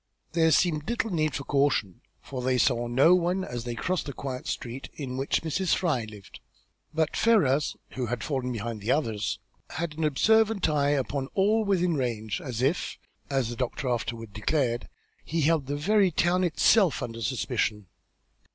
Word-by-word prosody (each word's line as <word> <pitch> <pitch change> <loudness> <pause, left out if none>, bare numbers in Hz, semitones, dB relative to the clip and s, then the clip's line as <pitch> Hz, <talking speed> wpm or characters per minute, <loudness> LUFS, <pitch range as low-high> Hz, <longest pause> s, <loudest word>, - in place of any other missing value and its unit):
There 160 0 +3
seemed 155 0 +2
little 235 -2 -1
need 155 -3 +2
of - - -5
this 140 - -3
caution, 140 -10 +1 0.2
for 130 -2 -5
they 130 0 +1
saw 120 -2 +2
no 135 +8 +5
one 180 +1 +1
as 120 -7 -5
they 120 -1 -3
crossed 180 +5 -2
to 140 - -4
the - - -31
quiet 130 -2 -5
street 125 +2 -5
in 130 -4 -5
which 135 +4 0
Mrs. 165 +3 +1
Fry 150 -11 0
lived. 105 -3 -12 0.5
But 160 -1 0
Ferrars, 150 - +3 0.2
who 125 -2 -3
had 120 0 -3
fallen 130 -4 -2
behind 115 -1 -4
the 105 - -5
others, 110 -8 0 0.3
had 160 0 -4
an - - 0
observant 215 +7 +3
eye 145 -2 +2
upon 140 -1 -1
all 210 +3 +3
within 180 -3 +2
range, 120 0 -2
as 125 -4 -3
if, 145 +7 0 0.3
as 135 -4 0
the 120 - -5
doctor 125 +1 -2
afterward 115 -3 -3
declared, 120 +2 -1 0.3
he 165 +1 -1
held 155 -2 +2
the 145 - -2
very 200 +5 +3
town 175 +2 +2
itself 180 +2 +3
under 115 -1 -6
suspicion. 105 +1 -1
140 Hz, 180 wpm, -27 LUFS, 120-170 Hz, 0.5 s, no